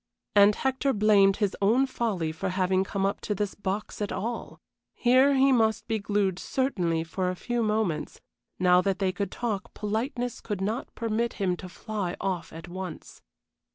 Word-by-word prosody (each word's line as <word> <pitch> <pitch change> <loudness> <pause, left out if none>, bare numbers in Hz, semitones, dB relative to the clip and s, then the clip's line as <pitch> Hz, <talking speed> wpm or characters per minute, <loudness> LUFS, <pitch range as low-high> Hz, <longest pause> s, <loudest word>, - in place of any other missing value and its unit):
And 205 0 +7
Hector 265 +1 0
blamed 200 -2 +4
his 205 -3 0
own 230 +7 +4
folly 215 -11 -1
for 185 +4 -3
having 185 0 +1
come 195 0 -2
up 200 - -1
to 210 - -2
this 205 0 -2
box 205 +2 -4
at 205 - -2
all. 235 +3 -4 0.4
Here 260 +3 +4
he 270 +1 +5
must 225 -3 +2
be 225 -2 0
glued 200 -2 0
certainly 180 -12 0
for 180 +3 -2
a 185 - -2
few 240 +5 -2
moments; 210 -8 -1 0.4
now 180 0 +5
that 195 0 0
they 190 -2 +1
could 200 +1 -3
talk, 230 -2 -4
politeness 235 +3 -2
could 205 -4 -4
not 215 +6 -3
permit 230 0 -1
him 185 -3 0
to 185 - -8
fly 205 -2 -4
off 185 -3 -2
at 165 +2 -9
once. 185 -1 -8
205 Hz, 175 wpm, -27 LUFS, 185-230 Hz, 0.4 s, And